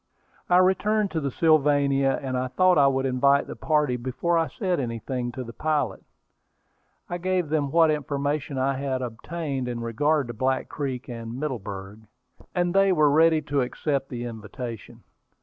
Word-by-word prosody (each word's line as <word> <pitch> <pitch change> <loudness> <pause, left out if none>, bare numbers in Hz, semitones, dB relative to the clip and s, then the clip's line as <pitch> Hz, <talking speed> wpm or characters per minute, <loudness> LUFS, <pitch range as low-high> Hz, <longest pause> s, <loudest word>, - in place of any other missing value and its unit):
I 180 - +5
returned 200 +3 +2
to 165 - -1
the 140 - -1
Sylvania, 140 -3 +3
and 130 -1 -2
I 125 0 -1
thought 185 +5 +3
I 140 - +6
would 135 0 +1
invite 140 +2 +3
the - - -8
party 150 -5 +1
before 130 +8 -1
I 165 -1 +2
said 185 -5 -2
anything 120 0 -3
to 130 - -5
the 115 -1 -9
pilot. 150 -9 -1 1.0
I 175 - -4
gave 180 -2 0
them 150 -2 0
what 165 +1 +4
information 145 -1 -2
I 135 +1 0
had 130 -2 -2
obtained 135 +3 -4
in 120 -1 -3
regard 140 +6 +1
to - - -4
Black 130 +3 -1
Creek 130 -4 -4
and 115 0 -6
Middleburg, 105 -8 -5 0.6
and 175 -1 +1
they 195 0 +4
were 155 -5 +4
ready 160 +1 +4
to 145 -1 0
accept 135 +2 -2
the 120 -1 -5
invitation. 115 0 -8
140 Hz, 165 wpm, -25 LUFS, 125-155 Hz, 1.0 s, I